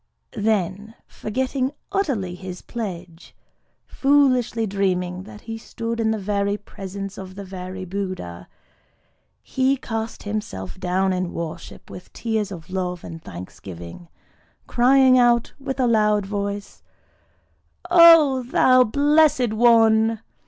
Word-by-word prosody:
Then 210 0 -1
forgetting 260 +4 -3 0.2
utterly 270 - -1
his 180 0 -8
pledge,—foolishly 230 - -2
dreaming 185 -3 -1
that 210 - -12
he 225 0 -7
stood 230 +1 -5
in 225 -1 +1
the 220 - 0
very 200 0 -1
presence 195 0 -8
of 185 -1 -9
the 200 - -7
very 185 0 -7
Buddha,—he 185 - -5 1.3
cast 225 -2 -5
himself 95 - -5
down 185 +1 0
in 180 -1 -3
worship 165 -2 -7
with 180 - -11
tears 220 -3 -2
of 170 -1 -9
love 180 -2 -3
and 165 -1 -9
thanksgiving; 90 - -10 0.6
crying 255 +1 +5
out 240 -1 +3
with 270 0 -5
a 255 - +3
loud 210 -3 +2
voice, 200 0 -5 1.1
"_O 315 -8 +7
thou 255 -1 +5
Blessed 285 -1 +3
One! 225 -1 +4
210 Hz, 110 wpm, -22 LUFS, 185-240 Hz, 1.3 s, O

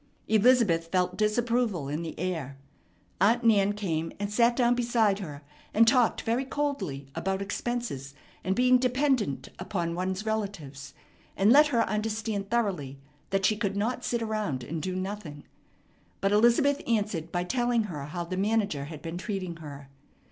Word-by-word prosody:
Elizabeth 220 -7 +4
felt 180 +1 0
disapproval 215 - 0
in 150 +3 -3
the 165 -2 -6
air. 160 -7 -3 0.6
Aunt 230 +5 +4
Nan 205 -3 +4
came, 165 -6 -2
and 205 0 -3
sat 235 +2 +4
down 245 -1 +3
beside 235 -4 +2
her, 150 -6 -7 0.3
and 225 +2 +6
talked 245 -1 +3
very 235 +4 0
coldly 260 - -3
about 190 +3 -2
expenses 200 - -4 0.3
and 190 +1 0
being 250 +1 +5
dependent 255 - 0
upon 170 -5 -2
one's 185 +4 -2
relatives, 155 -11 -4 0.4
and 200 +4 +5
let 295 +3 +7
her 235 -5 +1
understand 215 -1 -2
thoroughly 190 - -1 0.3
that 195 0 +1
she 215 - +3
could 205 -2 -2
not 245 +4 -1
sit 235 -1 -1
around 210 - -2
and 155 +6 -4
do 185 +2 -3
nothing; 185 -6 -5 0.8
but 195 - +1
Elizabeth 240 +7 +4
answered 205 -8 -1
by 175 0 0
telling 240 +3 +1
her 155 -9 -5
how 170 +4 -4
the 185 +2 -5
manager 200 -8 0
had 150 0 -9
been 165 +1 -5
treating 185 -5 -4
her. 145 -3 -9
200 Hz, 155 wpm, -28 LUFS, 170-235 Hz, 0.8 s, let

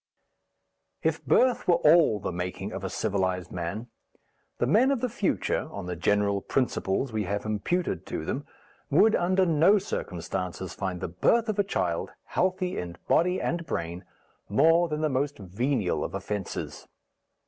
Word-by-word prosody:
If - - 0
birth 255 -1 +3
were 175 - +6
all 150 -10 +5
the - - -3
making 90 +3 -4
of 95 - -6
a 95 - -2
civilized 95 -4 -1
man, 90 +6 -4 0.7
the - - +1
men 220 - +4
of 275 -3 +1
the 250 - 0
future, 210 -4 -1
on 100 - -6
the 90 0 -4
general 100 +3 +1
principles 125 -1 -1
we 110 -2 -1
have 100 +3 -2
imputed 110 - -1
to - - -4
them, - - -3 0.4
would 220 0 +5
under 185 +2 +2
no 170 +5 +5
circumstances 90 - -4
find 90 -2 -4
the - - -2
birth 225 - +2
of 210 -1 -1
a - - +5
child, 90 - -1
healthy 185 0 -1
in 85 -1 -6
body 180 +2 +3
and 170 -1 -2
brain, 85 +2 -3 0.5
more 165 +10 +4
than 150 0 -2
the 155 - +2
most 145 +1 -1
venial 105 +1 -1
of - - -4
offences. 100 0 -5
110 Hz, 160 wpm, -27 LUFS, -, 0.7 s, were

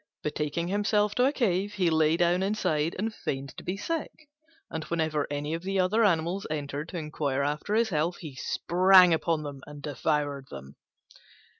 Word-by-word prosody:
Betaking 150 +3 -2
himself 205 +1 +1
to 250 - +3
a 270 - +3
cave, 205 -6 0
he 180 -4 +2
lay 160 0 +3
down 175 +1 +2
inside 170 -6 0
and 220 +3 -2
feigned 135 -8 -5
to - - -8
be 185 +2 -3
sick: 330 +8 -3 0.6
and 160 - -5
whenever 155 -3 -1
any 145 +2 -3
of 165 - -3
the 195 +1 -1
other 200 +5 +3
animals 180 0 +1
entered 145 0 -4
to 180 - -5
inquire 150 -3 -2
after 150 +8 -1
his 230 0 +2
health, 165 +1 0
he 155 -5 -8
sprang 180 +6 +5
upon 160 -1 0
them 140 -2 -7
and 145 -1 -10
devoured 145 -2 -1
them. 70 +1 -10
165 Hz, 175 wpm, -28 LUFS, 150-195 Hz, 0.6 s, sprang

